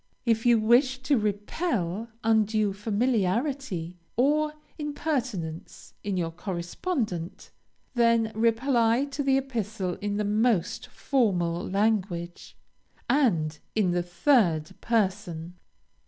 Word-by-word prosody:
If 230 0 +2
you 240 -1 +6
wish 250 +4 +4
to 285 +1 +3
repel 210 - -1 0.2
undue 215 -2 +2
familiarity 210 - -1 0.2
or 300 +4 +2 0.2
impertinence 255 - -4
in 200 -2 -2
your 165 -2 -1
correspondent, 180 - -4 0.4
then 230 -2 +3
reply 230 +2 +2
to 285 0 -4
the 270 -1 +3
epistle 215 -8 -3
in 205 0 -1
the 210 - 0
most 215 -2 +1
formal 180 - 0
language, 190 -4 -1 0.5
and 180 - +2 0.2
in 200 -5 +2
the 175 0 +1
third 175 - +2
person. 185 -6 -1
215 Hz, 100 wpm, -27 LUFS, 180-250 Hz, 0.5 s, you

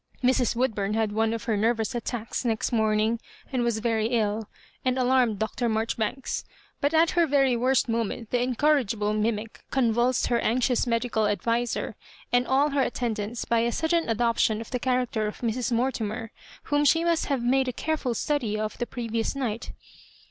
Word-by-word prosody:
Mrs. 250 -2 +2
Woodbura 215 -5 0
had 220 -2 +1
one 220 +1 +1
of 230 -1 -3
her 225 - 0
ner 225 +4 +2
vous 225 +2 -3
attacks 240 -1 -3
next 225 -3 0
morning, 220 0 +2 0.3
and 255 - +1
was 235 -2 +1
very 220 -1 0
ill, 220 -2 -1 0.3
and 255 0 +1
alarmed 250 -4 +3
Dr. 220 +3 -1
Maijoribanks; 225 +3 -2 0.4
but 285 - +1
at 325 +1 +4
her 340 -2 +3
very 270 -3 +3
worst 255 +3 +2
moment 230 0 -2
the 245 - +2
incorrigible 245 -5 +1
mimic 215 0 -2
convulsed 240 0 +2
her 240 -1 +1
anxious 245 +2 +1
medical 230 -2 +1
adviser 230 +3 -1 0.4
and 245 0 +3
all 280 +3 +3
her 280 0 +2
attendants 230 -2 -2
by 235 - +2
a 235 +1 +1
sudden 325 +1 0
adoption 230 -1 +2
of 225 - -8
the 250 - -1
character 250 -4 0
of 210 - -7
Mrs. 240 +1 -1
Mortimer, 230 -2 -1 0.3
whom 290 -1 +1
she 325 +3 +4
must 340 -1 +1
have 275 -4 0
made 260 +2 +2
a - - 0
careftil 275 -2 -2
study 240 -6 -1
of 215 0 -4
the 240 - -2
previous 230 0 -2
night. 235 -5 -3
235 Hz, 175 wpm, -26 LUFS, 220-255 Hz, 0.4 s, at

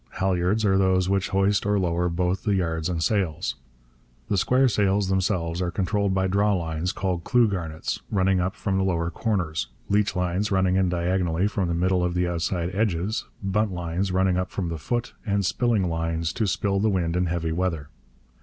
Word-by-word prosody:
Halliards 95 +3 +1
are 95 -1 +3
those 95 -1 +2
which 95 0 0
hoist 95 +1 +2
or 105 0 +1
lower 90 -1 0
both 90 +2 -1
the 105 -3 +1
yards 80 -2 -1
and 85 -2 -1
sails. 95 -7 0 0.8
The 100 - +1
square 130 +7 +3
sails 100 -3 +1
themselves 90 -2 0
are 90 - 0
controlled 100 +2 0
by 95 0 +1
drawlines 90 -4 0
called 90 -3 -2
clew 120 -2 +4
garnets 85 -6 -3
running 95 -2 +2
up 95 +3 -2
from 95 -2 -1
the - - +2
lower 85 -3 0
corners, 85 - -1 0.2
leechlines 100 -1 +1
running 95 -2 +2
in 95 -1 +2
diagonally 90 0 0
from 100 -3 0
the 85 - -1
middle 90 +1 +1
of 90 0 -1
the 90 0 +1
outside 85 +1 -2
edges, 100 0 -1 0.2
buntlines 95 -2 -1
running 95 0 +2
up 90 0 -1
from 90 -4 -3
the 80 -1 -4
foot, 120 +8 -2
and 100 -3 0
spilling 110 -2 +1
lines, 80 0 -2
to 110 - 0
spill 100 +1 0
the 110 +2 +2
wind 90 -4 0
in 90 0 +1
heavy 85 -1 -1
weather. 80 -4 -2
95 Hz, 180 wpm, -25 LUFS, 85-100 Hz, 0.8 s, clew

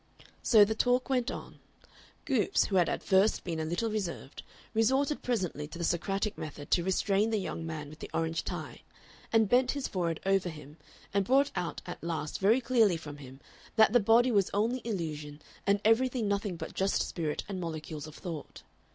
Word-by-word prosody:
So 215 -4 +6
the 220 - -1
talk 250 +3 +1
went 250 -1 +1
on. - - -8 0.7
Goopes, 255 -8 +2
who 195 - 0
had 175 - +4
at - - -3
first 195 +2 +3
been 165 -3 -3
a 160 - -1
little 175 +8 -1
reserved, 185 -9 -4 0.3
resorted 265 +6 +2
presently 180 - -2
to 150 - -9
the 170 - -4
Socratic 195 +5 -1
method 145 -1 -7
to 175 - +3
restrain 195 +3 +1
the 220 - +1
young 165 -4 -4
man 155 -2 -5
with 155 +2 -12
the - - -7
orange 165 0 -1
tie, - - -6 0.5
and 225 -1 +4
bent 250 +3 +3
his 280 -2 -3
forehead 170 -4 -2
over 195 -2 +2
him, 150 -1 -11 0.4
and 200 0 +3
brought 275 +7 +3
out 175 - -3
at 175 - -8
last 155 -3 -3
very 220 +7 +4
clearly 230 -7 +3
from 150 -2 -9
him 135 -1 -12 0.3
that 220 0 +5
the 245 - +7
body 230 +4 +4
was 200 -4 +3
only 235 +5 +1
illusion 155 -8 -4 0.3
and 200 +1 +4
everything 240 0 +3
nothing 200 -2 -1
but - - -7
just 195 +1 +1
spirit 155 -3 -3
and 190 -3 -4
molecules 155 -2 -5
of 155 - -11
thought. 165 -5 -7
195 Hz, 190 wpm, -30 LUFS, 160-225 Hz, 0.7 s, the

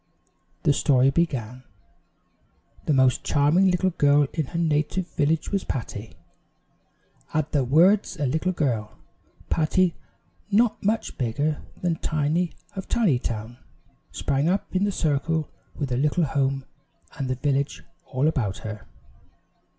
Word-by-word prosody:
The 145 - +4
story 135 -2 +3
began: 130 -7 -1 1.3
"The 150 - +3
most 130 -2 +3
charming 155 +7 +3
little 185 +1 +1
girl 145 -2 +4
in 155 -5 -1
her 165 - -5
native 165 +2 0
village 155 +2 0
was 195 -2 0
Patty 110 -3 -5 0.6
" - - -34
At 155 -1 0
the 140 -3 +2
words 175 - +4
a 145 - -1
little 160 +7 0
girl, 120 -11 -2 0.5
Patty, 170 +2 +2 0.6
not 220 +2 +2
much 215 +3 -1
bigger 145 +5 -1 0.2
than 170 -2 +1
Tiny 155 +4 0 0.2
of 190 - -5
Tinytown 120 - 0 0.5
sprang 140 +3 0
up 190 +1 -1
in 190 +2 +3
the 205 - 0
circle 155 -1 0 0.2
with 140 -3 -3
her 120 - +1
little 150 +6 +2
home 135 -1 0 0.5
and 135 -2 -2
the 130 - 0
village 135 - -1 0.2
all 130 +4 0
about 120 -11 0
her. 110 -1 -7
145 Hz, 135 wpm, -25 LUFS, 130-170 Hz, 1.3 s, The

